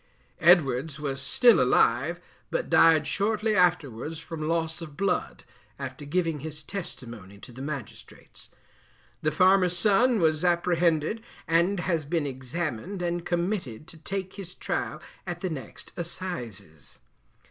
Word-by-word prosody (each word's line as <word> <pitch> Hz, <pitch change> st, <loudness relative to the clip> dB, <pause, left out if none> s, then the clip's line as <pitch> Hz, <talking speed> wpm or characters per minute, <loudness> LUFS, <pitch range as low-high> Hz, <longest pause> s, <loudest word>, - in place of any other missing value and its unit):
Edwards 155 Hz, -4 st, +4 dB
was 140 Hz, -2 st, -3 dB
still 245 Hz, -2 st, +5 dB
alive, -, -, +3 dB, 0.3 s
but -, -, -2 dB
died 160 Hz, -2 st, +6 dB
shortly 215 Hz, +4 st, 0 dB
afterwards 165 Hz, -, +1 dB
from 160 Hz, -2 st, -5 dB
loss 165 Hz, 0 st, -1 dB
of 150 Hz, -3 st, -9 dB
blood, 195 Hz, +1 st, -1 dB, 0.3 s
after 140 Hz, +1 st, -7 dB
giving 165 Hz, 0 st, 0 dB
his 150 Hz, +1 st, -7 dB
testimony 120 Hz, -, -8 dB
to 125 Hz, -, -12 dB
the 125 Hz, +2 st, -10 dB
magistrates. 140 Hz, -5 st, -8 dB, 0.7 s
The 155 Hz, -, +2 dB
farmer's 185 Hz, +2 st, +4 dB
son 220 Hz, +5 st, +3 dB
was 155 Hz, -2 st, +2 dB
apprehended, 175 Hz, +2 st, +2 dB, 0.3 s
and 175 Hz, +3 st, +2 dB
has 165 Hz, -4 st, -1 dB
been 160 Hz, 0 st, 0 dB
examined 145 Hz, -, -4 dB
and 175 Hz, 0 st, -1 dB
committed 175 Hz, -, -2 dB
to 165 Hz, -, -13 dB
take 190 Hz, +4 st, -4 dB
his 185 Hz, -2 st, -7 dB
trial -, -, -3 dB, 0.3 s
at 175 Hz, -1 st, -4 dB
the 185 Hz, -, -2 dB
next 135 Hz, -7 st, -7 dB
Assizes. 120 Hz, -, -5 dB
165 Hz, 130 wpm, -27 LUFS, 145-180 Hz, 0.7 s, died